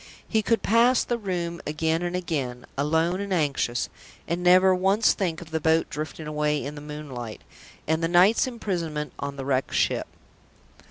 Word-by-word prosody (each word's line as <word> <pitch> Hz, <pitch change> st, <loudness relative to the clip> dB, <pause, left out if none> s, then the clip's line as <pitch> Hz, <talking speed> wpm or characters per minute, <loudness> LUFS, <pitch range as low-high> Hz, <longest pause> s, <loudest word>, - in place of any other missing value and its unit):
He 220 Hz, -, +2 dB
could 230 Hz, +1 st, +1 dB
pass 235 Hz, +3 st, +4 dB
the 240 Hz, -1 st, -2 dB
room 175 Hz, -4 st, -3 dB
again 160 Hz, +2 st, 0 dB
and 175 Hz, 0 st, -2 dB
again, 135 Hz, -9 st, -3 dB
alone 160 Hz, +6 st, +1 dB
and 200 Hz, -1 st, -5 dB
anxious, 140 Hz, -8 st, 0 dB, 0.4 s
and 170 Hz, +1 st, -1 dB
never 185 Hz, +1 st, +6 dB
once 195 Hz, +4 st, +3 dB
think 175 Hz, -4 st, -2 dB
of 165 Hz, -2 st, -11 dB
the 160 Hz, -, 0 dB
boat 160 Hz, +1 st, +2 dB
drifting 155 Hz, +1 st, -5 dB
away 150 Hz, -1 st, -1 dB
in 145 Hz, -, -5 dB
the 145 Hz, -, -9 dB
moonlight, 145 Hz, -7 st, -7 dB, 0.4 s
and 160 Hz, +1 st, 0 dB
the 165 Hz, -, +2 dB
night's 180 Hz, +8 st, +5 dB
imprisonment 170 Hz, -11 st, -3 dB
on 140 Hz, 0 st, -4 dB
the 135 Hz, -1 st, -6 dB
Wrecked 135 Hz, -1 st, 0 dB
Ship! -, -, +1 dB
165 Hz, 170 wpm, -25 LUFS, 150-185 Hz, 0.4 s, never